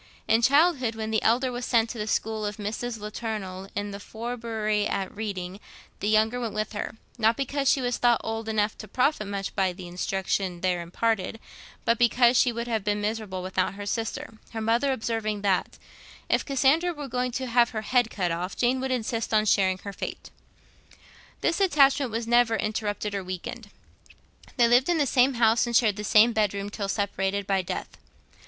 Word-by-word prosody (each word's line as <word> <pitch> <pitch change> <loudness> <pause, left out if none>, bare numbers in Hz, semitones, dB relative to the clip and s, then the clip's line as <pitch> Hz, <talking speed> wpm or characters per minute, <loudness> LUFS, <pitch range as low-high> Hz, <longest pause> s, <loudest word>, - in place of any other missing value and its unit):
In 225 +1 +4
childhood, 275 -3 +3
when 220 0 -4
the 220 - +1
elder 250 +3 +2
was 245 0 -5
sent 230 -2 +2
to 235 - -7
the 210 - -3
school 220 0 -1
of 210 0 -3
a - - -6
Mrs. 225 +3 -3
Latournelle, 210 -3 -5
in 205 +1 -3
the 200 - -7
Forbury 220 -2 -2
at 190 0 -3
Reading, 195 -3 -5 0.4
the 205 - -1
younger 220 +3 +3
went 230 -4 -4
with 215 0 -2
her, 210 - -4 0.2
not 225 +1 +3
because 275 0 0
she 270 - +3
was 245 -1 -1
thought 240 -1 +4
old 225 0 -4
enough 215 0 +1
to 215 - -8
profit 250 0 +1
much 200 -1 -4
by 190 -2 +2
the 180 0 -9
instruction 185 0 -2
there 180 -2 0
imparted, 220 +5 -1 0.5
but 230 0 +2
because 240 +1 +4
she 245 0 +4
would 235 +1 -4
have 220 -3 -1
been 210 0 0
miserable 205 -3 -3
without 185 +1 -1
her 205 0 -7
sister; 225 +1 -4
her 225 - -3
mother 230 +5 +2
observing 220 -4 -2
that 195 -2 0 0.5
'if - - +2
Cassandra 285 +6 +2
were 290 -2 -6
going 250 0 -1
to 260 +1 -2
have 240 -1 +3
her 215 -2 -4
head 245 0 +2
cut 180 -5 -1
off, 175 +3 -3
Jane 250 +2 +2
would 265 +1 -2
insist 230 -2 -2
on 215 -1 +3
sharing 190 -2 +3
her 200 - -6
fate.' - - -6 1.1
This 335 - +1
attachment 280 -8 +4
was 230 +1 -2
never 240 -1 +4
interrupted 210 -1 -2
or 200 -1 -2
weakened. 185 +4 -6 0.9
They 240 -2 +5
lived 245 +6 +4
in 345 - +3
the 295 - +2
same 260 0 +3
home, 230 -1 +4
and 235 - -2
shared 215 -4 +3
the 210 - -5
same 220 +3 +5
bed 210 -2 +1
room, 200 +1 -4
till 200 -1 -4
separated 200 -1 -1
by 195 -1 +1
death. 180 - -6
220 Hz, 195 wpm, -26 LUFS, 205-240 Hz, 1.1 s, They